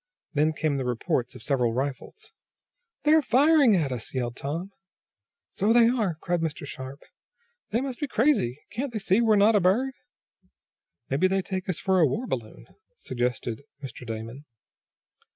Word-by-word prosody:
Then 155 +1 +2
came 155 -2 -1
the 135 - -2
reports 125 0 -1
of - - -11
several 125 -5 +1
rifles. 140 - -5 0.7
"They're 310 +1 +5
firing 280 -3 +5
at 155 -7 0
us!" 125 +1 -4
yelled 120 -2 -2
Tom. 165 +9 -4 0.8
"So 205 +3 +1
they 235 -1 +6
are!" 215 -9 0
cried 175 -1 -1
Mr. 155 -3 -3
Sharp. 135 0 -8 0.7
"They 230 +4 0
must 265 -2 -4
be 295 - -2
crazy! 225 - +2
Can't 250 +5 -3
they - - -2
see 195 0 +2
that 235 - +2
we're 220 -1 +5
not 205 +2 +5
a - - +5
bird." 220 +9 +2 1.2
"Maybe 150 +8 +3
they 190 0 0
take 185 0 -4
us 180 - 0
for 190 -1 +2
a 160 - +5
war 230 - -2
balloon," 120 - -5 0.3
suggested 120 -1 -3 0.2
Mr. 130 -2 -8
Damon. 115 +4 -7
175 Hz, 165 wpm, -26 LUFS, -, 1.2 s, they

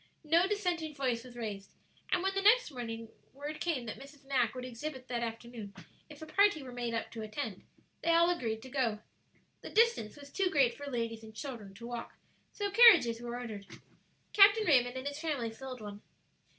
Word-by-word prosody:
No 335 +4 +4
dissenting 355 -7 -1
voice 250 -4 -1
was 250 -1 -13
raised, 205 -4 -6 0.4
and 365 -1 +2
when 385 0 +1
the 390 - 0
next 440 0 +5
morning 230 -3 -6 0.2
word 290 +3 -6
came 300 -8 -1
that 220 - -6
Mrs. 275 0 -14
Mack 255 -4 +1
would 255 0 -5
exhibit 255 +2 -6
that 240 -1 -1
afternoon 230 -3 -6 0.3
if 300 0 -11
a - - -6
party 395 -2 +3
were 255 - -8
made 240 -1 -3
up 230 - -3
to 225 - -6
attend, 215 -2 -5 0.4
they 335 - -1
all 335 +1 +5
agreed 220 -6 -3
to 260 - -10
go. 245 -5 0 0.6
The - - -8
distance 455 - +2
was 285 -1 -13
too 385 -2 +1
great 270 -7 +3
for 285 - -8
ladies 230 -3 -3
and 220 0 -12
children 220 -8 -7
to 230 +3 -10
walk, 240 0 -6 0.4
so 405 -1 -3
carriages 390 - +7
were 240 0 -5
ordered. 215 -5 -7 0.7
Captain 415 +2 +7
Raymond 255 -5 +3
and 260 +2 -4
his 285 +1 -4
family 285 -8 -2
filled 255 +1 -8
one. 205 -1 -8
255 Hz, 195 wpm, -32 LUFS, 230-315 Hz, 0.7 s, carriages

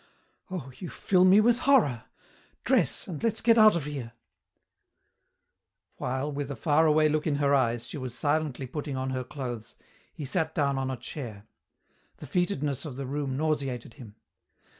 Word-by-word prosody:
"Oh, 165 -8 -6
you 180 - -6
fill 185 -2 +2
me 190 +3 +7
with 235 +2 +3
horror! 210 - +3 0.6
Dress, - - +1
and 165 -6 -6
let's 230 -2 0
get 230 -1 +4
out 215 -2 +7
of 165 -5 -2
here." 135 -6 -6 1.8
While, 130 +4 -2
with 145 -1 -4
a 140 - -4
faraway 155 0 +3
look 155 +1 0
in 150 - +1
her 140 0 +2
eyes, 120 -4 +1
she 150 - -6
was 130 -2 -5
silently 145 -3 0
putting 140 +1 -5
on 130 0 -2
her 130 -1 -2
clothes, 125 -4 -6 0.4
he 150 - -7
sat 160 +2 -1
down 140 -3 +1
on 130 0 -2
a 130 - -3
chair. 115 -4 -8 0.7
The - - -9
fetidness 150 -3 -1
of 150 -6 -7
the 135 +1 -5
room 135 0 -3
nauseated 140 -6 -2
him. 115 -5 -12
145 Hz, 165 wpm, -28 LUFS, 130-155 Hz, 1.8 s, me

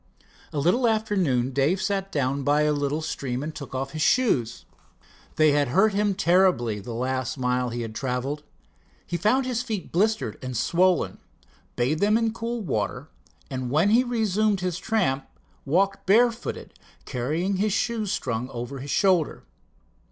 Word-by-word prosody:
A - - -5
little 180 - +3
after 220 -2 0
noon 130 -9 +1
Dave 140 +8 +1
sat 195 0 -2
down 140 -1 0
by 145 +2 +2
a 150 0 +2
little 145 +2 -1
stream 130 -3 -3
and 155 +1 -5
took 140 -4 -8
off 135 +1 -3
his 155 - -5
shoes. 140 - +1 0.7
They 155 -1 +5
had 145 -1 +2
hurt 195 - +3
him 205 -1 +1
terribly 175 - +2
the 115 +3 -7
last 130 +1 -2
mile 125 -1 0
he 120 0 -4
had 110 -1 -6
traveled. 130 +4 -3 0.6
He 175 - -4
found 230 +9 +2
his 245 -2 -1
feet 220 -6 -5
blistered 205 - 0
and 130 -2 -4
swollen, 175 +8 +2 0.6
bathed 135 +6 0
them 210 +2 +4
in 230 - +1
the 225 - 0
cool 230 +1 -4
water, 125 - -3 0.4
and 130 -2 -3
when 160 +10 +3
he 240 +3 +5
resumed 215 -4 +1
his 180 -1 -2
tramp 185 -13 0 0.4
walked 195 +7 +1
barefooted, 230 +3 +2 0.3
carrying 160 +10 -1
the 210 +3 +1
shoes 215 0 -1
strung 125 0 -2
over 125 +2 -6
his 140 +3 -7
shoulder. 185 -2 +2
155 Hz, 165 wpm, -25 LUFS, 130-205 Hz, 0.7 s, They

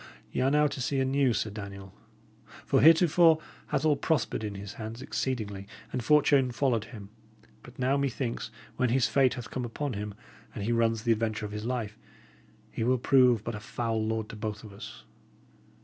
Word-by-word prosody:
Y' - - -1
are 130 - +3
now 150 +1 +4
to 140 -2 -2
see 135 +2 0
a 130 - +2
new 135 -1 +2
Sir 110 -1 -1
Daniel; 100 -2 -8 0.7
for 135 - +3
heretofore 165 0 +6 0.3
hath - - -1
all 150 -2 +4
prospered 140 -6 -1
in 105 -1 -4
his 100 +2 -7
hands 110 +2 -6
exceedingly, 105 -7 -3 0.3
and 125 - -2
fortune 140 -1 +4
followed 120 -4 0
him; 100 -5 -11 0.5
but 125 - -15
now, 130 +2 +1
methinks, 125 -5 -2 0.3
when 125 - +2
his 125 +1 +3
fate 135 -2 +3
hath 120 -3 -8
come 130 - -3
upon 125 +4 -3
him, 105 0 -5 0.4
and 100 - -4
he 115 - -1
runs 115 -1 +1
the 115 - +2
adventure 110 -1 0
of 105 - -6
his 105 +1 -5
life, 115 -3 -3 0.7
he - - -3
will 130 +2 +3
prove 125 -3 +4
but 120 - -4
a 105 - -5
foul 115 +1 -2
lord 110 0 -2
to - - -8
both 105 0 -5
of 105 -2 -11
us. 65 - -10
115 Hz, 195 wpm, -29 LUFS, 105-135 Hz, 0.7 s, heretofore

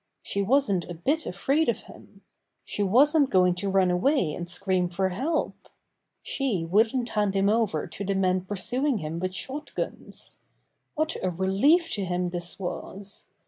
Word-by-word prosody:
She 200 - -1
wasn't 200 -6 +2
a 175 - -5
bit 290 - 0
afraid 275 - +1
of - - -1
him! - - -16 0.4
She - - -3
wasn't 275 +8 +4
going 180 -4 +4
to 190 +3 -3
run 190 -2 +3
away 180 - +2
and 175 +2 -6
scream 185 -1 0
for 190 +2 0
help. 270 - -2 0.5
She 235 - -1
wouldn't 225 +7 +2
hand 205 -3 0
him 195 +1 +3
over 215 -8 +1
to 200 - -7
the 195 0 -1
men 185 -1 +2
pursuing 245 +8 0
him 160 -2 -4
with 185 +1 -3
shot 285 +9 -5
guns. - - -5 0.6
What 310 +1 0
a 185 - 0
relief 200 - +3
to 200 - -1
him 180 -1 -1
this 175 +1 -3
was 195 +2 -5
195 Hz, 165 wpm, -26 LUFS, 180-260 Hz, 0.6 s, wasn't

